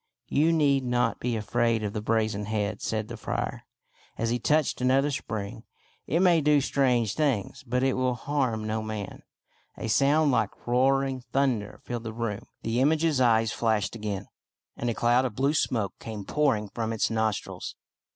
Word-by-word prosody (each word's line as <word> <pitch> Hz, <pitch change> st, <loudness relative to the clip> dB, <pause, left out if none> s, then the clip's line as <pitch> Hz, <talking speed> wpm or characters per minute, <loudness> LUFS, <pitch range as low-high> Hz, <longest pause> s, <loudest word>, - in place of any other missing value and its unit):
" -, -, -57 dB
You 155 Hz, +4 st, +3 dB
need 140 Hz, -4 st, +3 dB
not 120 Hz, -1 st, 0 dB
be 120 Hz, -1 st, -1 dB
afraid 115 Hz, +1 st, +1 dB
of 105 Hz, -1 st, -3 dB
the 105 Hz, -, -3 dB
brazen 110 Hz, -2 st, 0 dB
head," 105 Hz, -1 st, -2 dB
said 110 Hz, -1 st, -2 dB
the 120 Hz, 0 st, -7 dB
friar, -, -, -4 dB, 0.5 s
as 115 Hz, 0 st, 0 dB
he 120 Hz, -, 0 dB
touched 150 Hz, +1 st, +1 dB
another 135 Hz, +3 st, +3 dB
spring. 110 Hz, -4 st, -5 dB, 0.2 s
" -, -, -36 dB
It 170 Hz, -, +2 dB
may 175 Hz, -3 st, +5 dB
do 150 Hz, 0 st, +4 dB
strange 125 Hz, -6 st, +1 dB
things, 135 Hz, -11 st, -1 dB
but 125 Hz, +2 st, 0 dB
it 135 Hz, -1 st, +3 dB
will 130 Hz, -1 st, 0 dB
harm 125 Hz, -4 st, -1 dB
no 110 Hz, 0 st, -1 dB
man." 110 Hz, -2 st, -6 dB, 0.6 s
A -, -, -4 dB
sound 145 Hz, +6 st, +3 dB
like 110 Hz, -5 st, -1 dB
rolling 130 Hz, +1 st, +2 dB
thunder 125 Hz, -7 st, 0 dB
filled 120 Hz, -1 st, -5 dB
the 110 Hz, -, -4 dB
room, 115 Hz, -3 st, -4 dB, 0.2 s
the 115 Hz, +2 st, 0 dB
image's 155 Hz, 0 st, +2 dB
eyes 115 Hz, -2 st, +4 dB
flashed 110 Hz, -2 st, 0 dB
again, 105 Hz, -3 st, -4 dB, 0.5 s
and 120 Hz, -, -2 dB
a 115 Hz, -, -1 dB
cloud 120 Hz, +2 st, +3 dB
of 125 Hz, -5 st, -3 dB
blue 140 Hz, +4 st, +2 dB
smoke 110 Hz, -9 st, 0 dB
came 105 Hz, -3 st, -7 dB
pouring 130 Hz, -8 st, +1 dB
from 115 Hz, 0 st, -3 dB
its 110 Hz, -, 0 dB
nostrils. 110 Hz, -2 st, -2 dB
120 Hz, 180 wpm, -27 LUFS, 110-135 Hz, 0.6 s, may